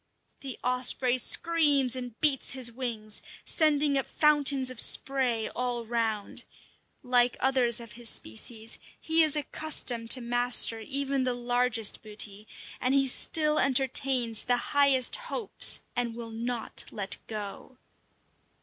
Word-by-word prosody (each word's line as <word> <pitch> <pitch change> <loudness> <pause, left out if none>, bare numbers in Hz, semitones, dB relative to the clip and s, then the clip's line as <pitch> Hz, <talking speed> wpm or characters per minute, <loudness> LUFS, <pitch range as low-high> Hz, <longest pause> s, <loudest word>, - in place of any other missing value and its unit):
The 270 -3 -7
osprey 250 0 +2
screams 290 -4 +2
and 245 -3 -8
beats 290 -5 +3
his 255 -2 +1
wings, 225 -4 -6 0.2
sending 295 -3 +1
up 270 - -5
fountains 285 -3 +2
of 250 - -7
spray 255 -5 +1
all 245 -1 -4
round. 225 -3 -3 0.6
Like 245 0 +1
others 255 -3 +3
of 230 -2 -11
his 235 +1 -5
species, 220 - -8 0.2
he 325 +1 +1
is 310 -2 +2
accustomed 275 -6 -1
to 255 - +5
master 245 -1 +1
even 275 +3 -2
the 250 -1 -1
largest 245 -2 +1
booty, 210 -1 -6 0.3
and 255 +2 0
he 275 -1 +3
still 305 +3 +1
entertains 260 -3 +2
the 245 0 +1 0.2
highest 275 -3 +4
hopes - - 0
and 240 -2 -3
will 230 -1 -8
not 235 +1 -2
let 195 -2 -1
go. 215 +4 -7
250 Hz, 130 wpm, -27 LUFS, 230-275 Hz, 0.6 s, to